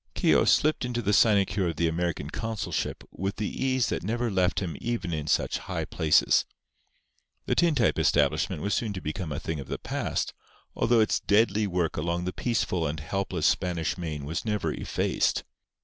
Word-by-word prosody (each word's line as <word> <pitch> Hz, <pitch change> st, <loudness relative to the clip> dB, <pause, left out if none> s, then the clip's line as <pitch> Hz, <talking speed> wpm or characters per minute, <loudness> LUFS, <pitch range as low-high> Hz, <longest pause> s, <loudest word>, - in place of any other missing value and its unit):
Keogh -, -, +4 dB
slipped 155 Hz, -2 st, +3 dB
into 120 Hz, -1 st, -2 dB
the 105 Hz, -, +1 dB
sinecure 100 Hz, -3 st, +3 dB
of 85 Hz, -, -2 dB
the 85 Hz, -, +1 dB
American 80 Hz, -3 st, -2 dB
consulship 110 Hz, -2 st, -3 dB
with 95 Hz, +3 st, -3 dB
the 105 Hz, -, -3 dB
ease 130 Hz, -2 st, +1 dB
that -, -, -2 dB
never 115 Hz, +4 st, -1 dB
left 95 Hz, -1 st, +1 dB
him 90 Hz, -5 st, -4 dB
even 115 Hz, -8 st, -2 dB
in 75 Hz, -1 st, -3 dB
such -, -, +1 dB
high -, -, -4 dB
places. 75 Hz, -3 st, +3 dB, 1.0 s
The -, -, +1 dB
tintype 150 Hz, -, +2 dB
establishment 75 Hz, -, +2 dB
was 100 Hz, -, 0 dB
soon 110 Hz, -3 st, -1 dB
to 95 Hz, -, -4 dB
become 80 Hz, +1 st, -4 dB
a 75 Hz, -, -3 dB
thing 80 Hz, -2 st, -4 dB
of 70 Hz, -, -7 dB
the -, -, -3 dB
past, -, -, -2 dB, 0.4 s
although 115 Hz, -1 st, +3 dB
its 110 Hz, -, +2 dB
deadly 105 Hz, 0 st, +2 dB
work 90 Hz, -3 st, -1 dB
along 85 Hz, +3 st, -1 dB
the 90 Hz, -, -3 dB
peaceful 95 Hz, -, 0 dB
and 75 Hz, +2 st, -3 dB
helpless 90 Hz, 0 st, -2 dB
Spanish 90 Hz, -2 st, +1 dB
Main 80 Hz, -5 st, -5 dB
was 80 Hz, +3 st, -3 dB
never 105 Hz, -2 st, -1 dB
effaced. -, -, 0 dB
95 Hz, 180 wpm, -27 LUFS, 80-110 Hz, 1.0 s, Keogh